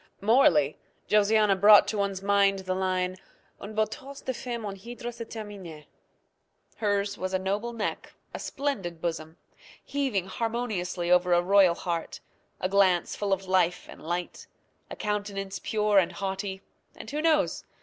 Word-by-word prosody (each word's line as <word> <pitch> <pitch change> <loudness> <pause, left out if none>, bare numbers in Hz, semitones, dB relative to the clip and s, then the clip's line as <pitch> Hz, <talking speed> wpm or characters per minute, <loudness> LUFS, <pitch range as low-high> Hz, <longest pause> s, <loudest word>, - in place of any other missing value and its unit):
Morally, 185 - +4 0.3
Josiana 210 -1 +4
brought 205 +2 +7
to 215 - -2
one's 195 -1 -2
mind 200 -1 +3
the 185 - -1
line 185 -1 -1 0.4
"Un 210 +2 -8
beau 215 0 +3
torse 270 +6 -10
de 260 - -3
femme 235 -2 -5
en 200 -1 -4
hydre 240 +4 -7
se 230 0 -7
termine." 200 -9 -9 0.9
Hers 205 -1 -1
was 185 0 -2
a - - +4
noble 200 +5 -2
neck, 225 -3 -4 0.2
a - - -5
splendid 200 - -3
bosom, 160 -1 -4 0.5
heaving 265 -10 -1
harmoniously 195 -5 -2
over 180 0 +4
a 175 - +5
royal 190 -2 +5
heart, 170 -2 -4 0.4
a 185 - 0
glance 190 -3 +2
full 205 -1 -2
of 195 0 0
life 180 -2 +1
and - - -12
light, 175 +2 -4 0.4
a - - -6
countenance 205 -2 -3
pure 210 -2 +2
and 180 -1 0
haughty, 190 +1 -4 0.3
and - - -9
who 300 +1 -2
knows? 315 -2 +2
200 Hz, 155 wpm, -27 LUFS, 185-215 Hz, 0.9 s, brought